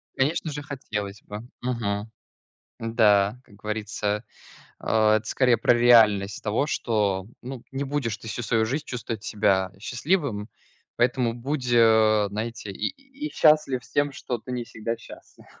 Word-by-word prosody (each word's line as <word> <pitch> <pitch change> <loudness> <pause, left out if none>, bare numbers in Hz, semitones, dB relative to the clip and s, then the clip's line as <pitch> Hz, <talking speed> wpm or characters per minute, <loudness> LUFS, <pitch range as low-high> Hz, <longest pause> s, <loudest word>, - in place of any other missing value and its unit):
Конечно 155 +3 0
же 145 +1 -5
хотелось 105 -8 -5
бы, 105 0 -7 0.2
мгм. 110 -3 -2 0.7
М-да, 110 -1 +3
как - - -19
говорится, 105 0 -3 0.6
а, 110 -1 +3
это 110 - -7
скорее 125 -3 +3
про 115 - +4
реальность 110 -4 +5
того, 115 +7 0
что, 100 -7 0
ну, 130 -1 -7
не 135 +1 -2
будешь 135 -6 -2
ты 115 - -11
всю 120 - -4
свою 110 -1 +1
жизнь 145 +6 -2
чувствовать 115 -3 -5
себя 95 -3 +1
счастливым, 125 - -1 0.5
поэтому 120 -1 +1
будь, 130 +2 -3
знаете, 110 -2 +3
и - - -2
и 275 +2 -8
и - - -10
счастлив 150 -5 +3
с - - -18
тем, 145 0 +1
что 125 -4 -4
ты 125 - -9
не 125 -1 -2
всегда 115 0 -4
счастлив. 115 - -14
115 Hz, 150 wpm, -25 LUFS, 105-130 Hz, 0.7 s, реальность